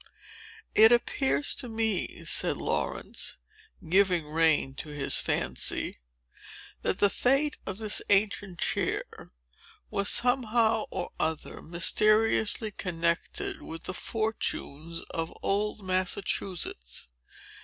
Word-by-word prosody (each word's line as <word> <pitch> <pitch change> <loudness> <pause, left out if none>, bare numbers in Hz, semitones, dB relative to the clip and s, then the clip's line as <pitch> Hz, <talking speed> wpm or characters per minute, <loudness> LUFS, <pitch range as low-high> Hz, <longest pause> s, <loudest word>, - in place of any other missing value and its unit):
"It 220 +2 +8
appears 265 +4 +2
to 250 - -4
me," 220 -4 -1
said - - +1
Laurence, - - -3 0.5
giving 180 -1 +3
the 150 - -14
rein 160 -4 +2
to 155 - -6
his 145 -2 0
fancy, - - -1 0.8
"that - - 0
the 205 - +5
fate 275 +4 +2
of 195 - -4
this 215 -1 +1
ancient 200 -2 +2
chair - - 0 0.9
was, 200 0 +1
somehow 230 -3 +2
or - - -4
other, 160 0 -2
mysteriously 215 +5 +2
connected 170 -3 -2
with 165 0 -8
the 185 - -4
fortunes 170 -7 -3
of 165 0 -3
old 205 0 0
Massachusetts. 185 - -1
195 Hz, 105 wpm, -29 LUFS, 165-220 Hz, 0.9 s, It